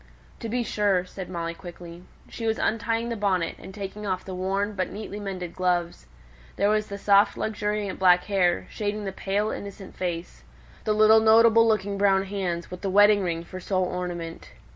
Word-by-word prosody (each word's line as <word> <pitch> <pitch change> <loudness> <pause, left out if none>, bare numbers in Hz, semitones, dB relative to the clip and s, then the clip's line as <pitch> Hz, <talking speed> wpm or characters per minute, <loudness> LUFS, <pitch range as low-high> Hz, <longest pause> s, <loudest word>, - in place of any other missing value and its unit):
"To 230 - -5
be 245 +2 0
sure!" 200 -5 +1
said 185 0 -8
Molly, 170 -2 -3
quickly. 175 0 -11 0.2
She 230 - -5
was 220 - +1
untying 230 +1 -1
the 235 - -2
bonnet, 190 -5 0
and 190 - -10
taking 205 +1 -6
off 185 -1 -2
the 190 - -6
worn, 195 +3 -1
but 185 -2 -2
neatly 210 0 -7
mended 185 -4 -5
gloves; 175 -2 -1 0.5
there 200 +2 +2
was 215 0 +1
the 200 - -6
soft 200 0 +4
luxuriant 210 -2 -2
black 180 -1 +5
hair, 185 -4 +1
shading 210 -1 -3
the 195 - -3
pale, 205 +3 -1
innocent 200 -1 -8
face, 175 -2 -4 0.4
the 215 - +2
little 215 +1 +6
notable 230 +1 +6
looking 200 -2 0
brown 195 -1 +4
hands, 185 -4 -3
with 180 - -7
the 195 - -2
wedding 205 +1 +6
ring 170 -2 -2
for 185 +2 -8
sole 185 0 0
ornament. 175 -2 -5
195 Hz, 185 wpm, -25 LUFS, 180-210 Hz, 0.5 s, little